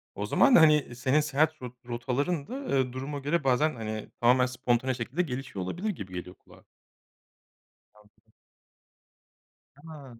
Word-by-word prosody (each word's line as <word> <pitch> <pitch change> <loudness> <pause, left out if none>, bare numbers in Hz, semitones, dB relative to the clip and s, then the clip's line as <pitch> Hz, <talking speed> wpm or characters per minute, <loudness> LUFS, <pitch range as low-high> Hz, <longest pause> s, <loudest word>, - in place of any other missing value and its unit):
O - - -3
zaman, 275 -3 +4
hani, 150 -6 +5
senin 130 +4 +2
seyahat 150 0 0
rot 125 -1 -7
rotaların 135 +6 -2
da, 270 +2 -6
eee, 130 -1 0
duruma 140 +3 -5
göre 145 +3 -1
bazen, 135 +4 +2
hani, 110 -2 -5
tamamen 125 +2 +5
spontane 125 0 0
şekilde 125 +7 -2
gelişiyor 130 - -5
olabilir 180 - -3
gibi 100 - -6
geliyor 90 0 -7
kulağa. - - -20 1.3
Anladım. 105 +1 -26 1.4
Tamam. 145 -5 -12
130 Hz, 135 wpm, -28 LUFS, 120-150 Hz, 1.4 s, hani